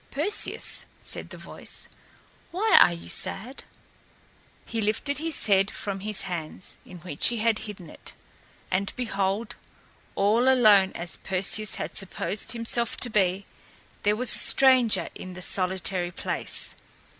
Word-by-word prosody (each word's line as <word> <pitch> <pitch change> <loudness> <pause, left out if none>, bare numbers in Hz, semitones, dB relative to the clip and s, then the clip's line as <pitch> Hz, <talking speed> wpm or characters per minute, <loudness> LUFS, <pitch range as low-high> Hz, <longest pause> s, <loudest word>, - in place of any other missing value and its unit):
"Perseus," 335 +10 -1
said - - -4
the - - -10
voice, - - -7 0.6
"why 415 +5 +2
are - - +6
you 170 0 -8
sad?" 250 +7 +2 1.0
He 225 -1 -3
lifted 220 +7 0
his 325 -1 -1
head 195 -1 +3
from 195 -1 -5
his 210 0 -2
hands, 175 -1 -6
in 180 - -11
which 155 -4 0
he 240 - +1
had 220 -1 +1
hidden 190 -5 -9
it, - - -12 0.6
and 195 +2 0
behold! 205 -1 -2 0.6
all 220 +6 +3
alone 210 -7 +5
as 175 +1 -4
Perseus 190 +2 +1
had - - -6
supposed 195 +3 -2
himself 235 0 -1
to 245 - +3
be, 195 -2 +1 0.6
there 210 0 +2
was 245 +1 +2
a - - +2
stranger 255 -4 +4
in 185 -1 -9
the 185 - -9
solitary 185 -1 -1
place. 180 - -1
205 Hz, 140 wpm, -26 LUFS, 190-235 Hz, 1.0 s, are